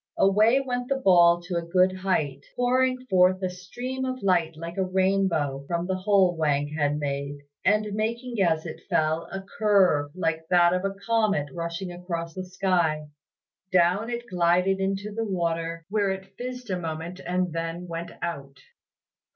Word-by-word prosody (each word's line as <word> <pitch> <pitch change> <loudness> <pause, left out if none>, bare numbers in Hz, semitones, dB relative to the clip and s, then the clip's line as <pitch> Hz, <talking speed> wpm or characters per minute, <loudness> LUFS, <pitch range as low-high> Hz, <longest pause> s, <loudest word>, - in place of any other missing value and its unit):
Away 215 +6 +4
went 250 -2 -3
the 275 - +2
ball 175 -8 +5
to 175 -1 -3
a - - 0
good 185 +2 +2
height, 150 -8 -1
pouring 255 +1 +1
forth 185 -3 +4
a 185 - 0
stream 245 +9 -6
of 255 -2 -3
light 175 -4 +2
like 170 +1 -7
a 190 - +2
rainbow 185 -7 +1
from 170 0 -1
the 190 +1 -1
hole 185 -2 +3
Wang 145 -2 +1
had 150 -1 0
made, 140 -1 -3 0.3
and 210 +1 +2
making 230 +2 -2
as 160 -3 +2
it 160 - -7
fell 160 +1 +1
a 195 +1 -5 0.2
curve 190 -9 +4
like 160 -2 -2
that 175 0 +4
of 180 +1 0
a 195 0 -2
comet 215 -10 +1
rushing 170 +2 -4
across 170 -2 -5
the 185 -1 -5
sky. 175 -5 0 0.6
Down 185 +5 +3
it 240 0 -4
glided 180 0 +2
into 195 +2 -2
the 225 +2 -2
water, 165 -4 -2
where 205 0 +1
it 190 0 -5
fizzed 250 -2 -6
a 180 - -1
moment 165 +2 -5
and 180 -1 -1
then 165 +1 -4
went 170 0 -5
out. 140 -5 -5
180 Hz, 165 wpm, -26 LUFS, 165-200 Hz, 0.6 s, ball